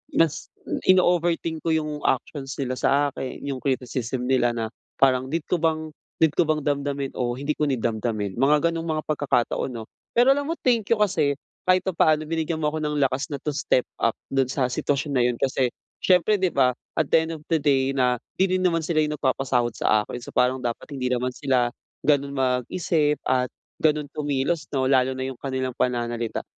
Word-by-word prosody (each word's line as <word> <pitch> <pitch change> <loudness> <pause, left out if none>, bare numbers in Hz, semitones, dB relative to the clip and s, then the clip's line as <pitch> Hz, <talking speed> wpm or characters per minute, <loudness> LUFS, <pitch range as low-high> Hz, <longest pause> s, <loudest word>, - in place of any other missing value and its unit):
mas 160 -2 +2 0.2
m - - -3
ino-overthink 175 -3 +3
ko 165 - +2
'yung 150 -1 -2
actions 135 +1 -2
nila 130 -2 -3
sa 145 +1 +3
akin. 130 - -6
'Yung 140 -2 -3
criticism 130 -2 -2
nila 125 -2 +2
na 115 -1 -3 0.2
parang 130 -1 +3
need 160 +3 -2
ko 175 - +2
bang, 160 -1 0 0.3
need 160 - +5
ko 170 - +3
bang 155 -1 0
damdamin 140 -1 -1
o 120 -1 0
hindi 140 +3 -2
ko 150 - +2
need 130 -5 -1
damdamin, 110 -2 -2
mga 150 +5 +4
ganong 165 0 -4
mga 155 -1 -1
pagkakataon 140 -4 0
'no. 115 -1 -5 0.3
Pero 245 +3 +6
alam 285 +1 +1
mo 330 - -1
thank 230 -5 +2
you - - +3
kasi 160 -9 +2 0.3
kahit 185 0 +4
papaano 155 -4 +2
binigyan 160 0 -2
mo 150 - +1
ako 155 +1 -2
ng 150 -1 -1
lakas 135 +2 0
na, 140 - -3
to 150 +1 -3
step 130 -2 +1
up 115 - +1 0.2
dun 135 -1 0
sa 135 -2 +1
sitwasyon 140 +3 -1
na 125 - +4
'yun, 120 -1 0
kasi 130 -2 +1 0.3
siyempre 185 +3 +4
'di 185 -2 +1
ba, 125 -2 +3 0.2
at 155 - +2
the - - +5
end 165 - -5
of 155 - -8
the 165 - +3
day 135 -2 +1
na 125 -2 +2 0.2
'di 190 0 +2
'din 185 - +1
naman 165 -2 0
sila 155 -1 0
'yung 150 0 -1
nagpapasahod 130 -3 +1
sa 105 -1 +2
akin. 125 - -7
So - - -9
parang 125 +1 +3
dapat 120 +4 -4
hindi 130 -3 -2
naman 125 0 0
sila 125 -2 +1 0.3
ganun 140 -1 +2
mag-isip 145 +4 +1
at 125 0 +1 0.3
ganun 150 -2 +1
kumilos 145 +1 -1
'no, 130 -1 +1
lalo 130 0 +3
na 130 - -3
'yung 130 -2 -5
kanilang 130 -1 -2
pananalita. 120 -2 -1
140 Hz, 200 wpm, -24 LUFS, 130-155 Hz, 0.3 s, Pero